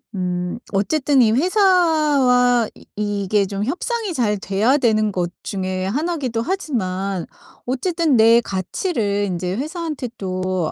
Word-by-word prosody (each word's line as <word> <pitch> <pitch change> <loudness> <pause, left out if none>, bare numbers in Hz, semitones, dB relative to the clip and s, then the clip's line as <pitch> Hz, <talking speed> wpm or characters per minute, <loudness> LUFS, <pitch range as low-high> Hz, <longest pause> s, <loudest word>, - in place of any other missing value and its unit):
음 180 +1 -2 0.2
어쨌든 270 +6 +2
이 220 -2 +4
회사와 295 - +3
이 - - -17
이게 205 -1 0
좀 200 +1 -3
협상이 415 - -2
잘 215 -8 0
돼야 210 +8 +2
되는 215 -5 +2
것 175 -2 -2
중에 185 -1 -3
1 305 - -1
이기도 250 -7 -2
하지만 200 - -2 0.4
어쨌든 320 +3 0
내 225 +1 +6
가치를 205 - -2
인제 180 +1 -3
회사한테 310 -2 -4
또 185 -3 -2
225 Hz, 240 characters per minute, -20 LUFS, 195-300 Hz, 0.4 s, 내